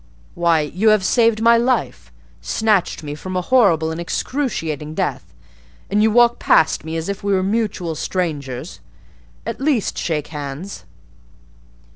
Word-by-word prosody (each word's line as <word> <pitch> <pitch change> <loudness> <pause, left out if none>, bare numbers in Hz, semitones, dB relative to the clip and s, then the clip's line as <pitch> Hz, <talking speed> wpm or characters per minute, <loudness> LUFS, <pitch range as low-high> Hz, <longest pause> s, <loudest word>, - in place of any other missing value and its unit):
Why, 170 -2 +2
you 185 +9 +1
have 215 -2 +4
saved 225 -1 +3
my 235 0 +6
life!—snatched 175 - -1
me 145 -1 -5
from 185 +5 -7
a - - +1
horrible 175 -8 +3
and 160 +1 -4
excruciating 165 - -3
death! - - -3 0.6
and 205 +1 +3
you 220 - +4
walk 240 +1 +4
past 160 - +3
me 160 +1 -4
as 160 - -4
if 200 0 -4
we 200 0 +1
were 185 -1 +2
mutual 200 -5 -1
strangers! 150 -5 -4 0.7
At - - -5
least 270 -7 0
shake 150 -3 -2
hands." 150 - -7
180 Hz, 140 wpm, -20 LUFS, 155-220 Hz, 0.7 s, my